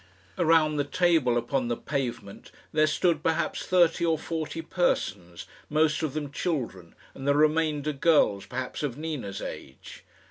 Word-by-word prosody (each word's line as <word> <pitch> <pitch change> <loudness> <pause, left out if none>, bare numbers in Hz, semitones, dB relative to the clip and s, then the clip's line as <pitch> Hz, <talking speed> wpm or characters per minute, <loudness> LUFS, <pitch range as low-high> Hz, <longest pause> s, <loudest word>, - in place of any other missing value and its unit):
Around 160 -3 +4
the 145 - +2
table 155 -6 +2
upon 120 +2 -1
the 120 -1 -1
pavement 120 -8 -4 0.2
there 155 0 +3
stood 155 0 +1
perhaps 160 +1 -1
thirty 175 -2 +3
or 165 -1 +2
forty 160 0 -4
persons, 95 - -1 0.2
most 155 +1 +2
of 155 -3 -3
them 145 -2 -3
children, 120 - -3 0.2
and 135 +1 -7
the 140 - +4
remainder 155 -1 +2
girls 140 - +2
perhaps 130 0 -5
of 140 -4 -3
Nina's 150 -11 -5
age. 65 - -9
150 Hz, 145 wpm, -27 LUFS, 125-160 Hz, 0.2 s, Around